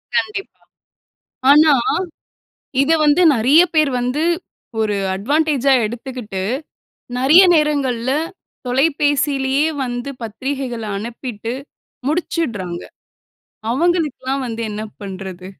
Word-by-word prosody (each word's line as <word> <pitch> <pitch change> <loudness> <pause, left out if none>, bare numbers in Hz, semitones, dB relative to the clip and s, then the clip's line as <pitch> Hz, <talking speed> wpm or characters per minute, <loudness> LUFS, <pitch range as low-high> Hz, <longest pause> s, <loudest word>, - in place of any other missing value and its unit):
கண்டிப்பா. 405 -2 -2 0.9
ஆனா, 300 +1 +7 1.1
இதவந்து 305 +1 +3
நிறைய 260 +8 +5
பேர் 305 -3 +4
வந்து, 250 +5 -1 0.6
ஒரு 210 -1 0 0.2
அட்வான்டேஜா 280 +5 +2
எடுத்துக்கிட்டு, 235 -4 -5 0.8
நிறைய 290 +8 +7
நேரங்கள்ல 270 -6 +1 0.6
தொலைபேசிலேயே 280 +1 +1 0.2
வந்து 245 +1 -4
பத்திரிகைகள 255 +1 -4
அனுப்பிட்டு 230 +1 -5 0.5
முடிச்சிட்றாங்க. 235 - -2 0.9
அவுங்களுக்லாம் 290 -3 0
வந்து 230 -1 -4
என்ன 210 +1 -4 0.2
பண்றது? 190 -2 -7
265 Hz, 75 wpm, -19 LUFS, 230-300 Hz, 1.1 s, ஆனா